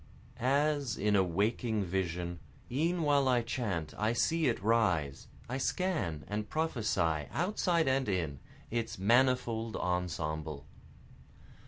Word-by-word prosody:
As 140 -1 +1
in 105 0 +2
a 95 - +5
waking 105 +4 0
vision, 85 -1 -2 0.3
E'en 165 +6 +1
while 140 -2 +3
I 125 -2 +3
chant 105 - -2
I 110 +2 +2
see 160 +5 +2
it 120 - +1
rise, 90 -12 +1 0.2
I 130 +3 -3
scan 135 - -1
and 105 +1 -3
prophesy 100 - 0
outside 175 -3 +1
and 130 -3 +1
in, 80 -8 -1 0.3
Its 115 -1 -2
manifold 115 +1 +2
ensemble. 80 -5 -2
110 Hz, 120 wpm, -32 LUFS, 90-135 Hz, 0.3 s, a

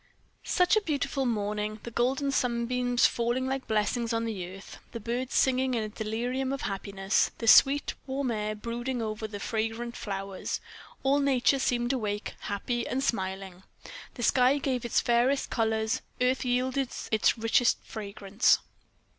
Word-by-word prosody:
Such 360 +3 +3
a 430 - +3
beautiful 280 -6 -1
morning! 210 -1 -2
The 235 - -7
golden 270 +5 +1
sunbeams 245 -1 +1
falling 240 +2 +1
like 265 0 -3
blessings 225 +2 0
on 230 0 0
the 195 -6 -4
earth; 195 +1 -11
the 230 - -4
birds 240 +4 -3
singing 260 -1 +2
in 225 - 0
a 215 - -4
delirium 240 +5 -2
of 275 - -3
happiness. 195 0 0
The 230 - -4
sweet, 280 +5 +6
warm 265 -1 -1
air 215 -1 -2
brooding 240 +4 -4
over 220 -1 -3
the 205 -1 -7
fragrant 225 +2 -3
flowers; 195 -1 -4 0.4
all 275 +2 +3
nature 275 -1 +3
seemed 245 -1 +1
awake, 210 -4 -3
happy 235 +4 -3
and 265 +1 -1
smiling; 190 -4 -2 0.5
the 240 - -5
sky 255 +4 +4
gave 260 -4 -2
its 235 - +2
fairest 245 +4 +2
colors; 220 +1 0 0.2
earth 250 +1 +2
yielded 255 +1 0 0.2
its 220 +1 +3
richest 225 +2 +3
fragrance. 205 0 +1
235 Hz, 150 wpm, -28 LUFS, 215-260 Hz, 0.5 s, sweet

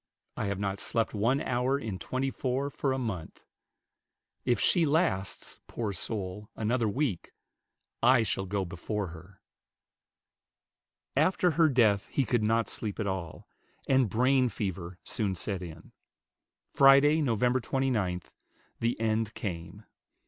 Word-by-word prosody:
I 105 - -2
have 100 -1 -2
not 100 0 -2
slept 115 +1 -1
one 115 +7 +1
hour 130 +2 0
in 110 -9 -5
twenty 130 +1 -2
four 135 +3 -2
for 135 0 -1
a 130 - 0
month. 110 -11 -5 1.0
If 120 - +2
she 175 - +4
lasts, 150 - 0
poor 110 -4 -3
soul, 100 +2 -3
another 115 +1 0
week, 125 - -2 0.7
I 115 - +5
shall 95 -2 -2
go 100 0 -1
before 90 +3 -4
her." 90 +4 -14 1.7
After 175 +4 +3
her 160 0 +4
death 110 -7 +3
he 135 - 0
could 120 +1 +1
not 115 +1 +2
sleep 105 -1 -4
at 110 - -1
all, 95 -4 -4 0.4
and 130 -4 +3
brain 125 +4 +3
fever 95 -5 -4
soon 100 -4 -1
set 95 0 -2
in. 80 -2 -10 0.8
Friday, 140 +3 +6
Nov. 120 -6 0 0.2
29, 110 -9 -1 0.6
the 115 0 0
end 110 0 0
came. 90 +1 -6
110 Hz, 135 wpm, -29 LUFS, 95-130 Hz, 1.7 s, Friday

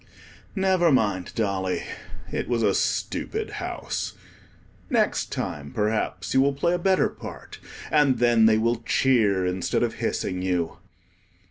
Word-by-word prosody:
Never 190 -4 +3
mind, 100 -8 +1
Dolly; 95 -4 -1 0.5
it - - -2
was 120 -2 +1
a 100 -2 +3
stupid - - -1 0.2
house. - - -4 0.8
Next - - +1
time, 70 -1 -4
perhaps, 105 +1 -1
you 130 - +5
will 140 +1 +3
play 170 +5 +1
a 175 - 0
better 190 +1 +3
part; - - -10 0.3
and 145 -4 +4
then 120 -2 +5
they 110 -1 +4
will 115 +2 +1
cheer, 110 -7 +2
instead 90 0 0
of - - 0
hissing 90 0 -1
you. 90 -3 -1
110 Hz, 135 wpm, -25 LUFS, 95-135 Hz, 0.8 s, you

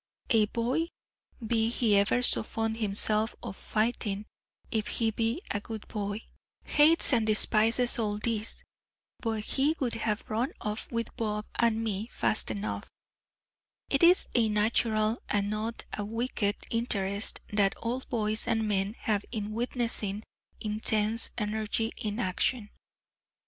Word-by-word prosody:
A 220 -3 +5
boy 245 +9 -1 0.6
be 225 0 +1
he 230 -3 +2
ever 200 +5 +3
so - - +8
fond 225 0 -3
himself 215 +1 +1
of - - -6
fighting, 215 -2 -1 0.5
if 220 -2 -1
he 225 -1 +1
be 230 - -1
a 205 - -1
good 220 -1 -8
boy, 205 0 -4 0.4
hates 300 0 +5
and 225 -3 +2
despises 225 +3 +4
all 210 -2 -1
this, 220 0 -3 0.6
but 220 -2 -2
he 285 +7 +2
would 250 -4 -1
have 220 -2 -2
run 230 +5 -1
off 210 +1 -4
with 230 -1 -3
Bob 210 -1 -2
and 225 -1 +2
me 215 0 -2
fast 215 - +1
enough; 100 -1 -4 1.0
it 275 - +2
is 350 +2 +6
a 230 -3 +3
natural, 215 +1 +1
and 205 -1 +1
a - - -3
not 220 +2 -3 0.2
wicked, 215 0 -1 0.2
interest 205 -3 0
that 200 -2 +2
all 240 +3 -3
boys 215 -2 -1
and 225 -1 +1
men 200 +1 0
have 205 -2 0
in 215 -3 -4
witnessing 230 -3 -1 0.4
intense 215 +1 +2
energy 220 +1 -1
in 210 +1 -3
action. 205 +3 0
220 Hz, 140 wpm, -29 LUFS, 210-230 Hz, 1.0 s, so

